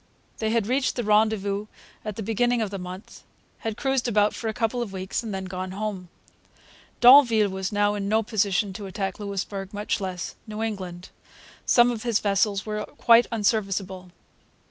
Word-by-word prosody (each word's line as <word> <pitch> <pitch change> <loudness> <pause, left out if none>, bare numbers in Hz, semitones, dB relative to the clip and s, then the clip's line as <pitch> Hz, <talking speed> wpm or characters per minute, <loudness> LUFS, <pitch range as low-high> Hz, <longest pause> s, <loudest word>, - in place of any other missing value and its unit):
They 220 - 0
had 225 -2 +1
reached 255 +4 0
the 240 - -2
rendezvous 210 -1 +1 0.4
at 215 -2 -5
the 220 - -5
beginning 240 +3 +1
of 215 -3 -2
the 195 - -5
month, 180 +2 -9 0.4
had 225 -2 -4
cruised 270 -3 0
about 210 -2 +2
for 230 - -5
a - - 0
couple 230 +3 -1
of 230 -5 -4
weeks, 190 0 -3
and 225 -2 -6
had 190 -1 -4
then - - -7
gone 185 0 -5
home. 195 -3 -4 0.9
D'Anville 240 -5 +7
was 190 +1 -3
now 205 0 +2
in 200 -1 -3
no 220 +1 +2
position 205 -2 0
to 200 0 -7
attack 195 0 -4
Louisbourg, 200 0 -5
much 205 0 -2
less 185 -2 -4
New 215 +1 -4
England. 185 -5 -5 0.6
Some 240 0 +5
of 230 -2 -5
his 235 -3 +1
vessels 200 0 +1
were 210 -1 -3
quite 235 +2 +4
unserviceable. 195 -4 -1
210 Hz, 180 wpm, -25 LUFS, 195-225 Hz, 0.9 s, D'Anville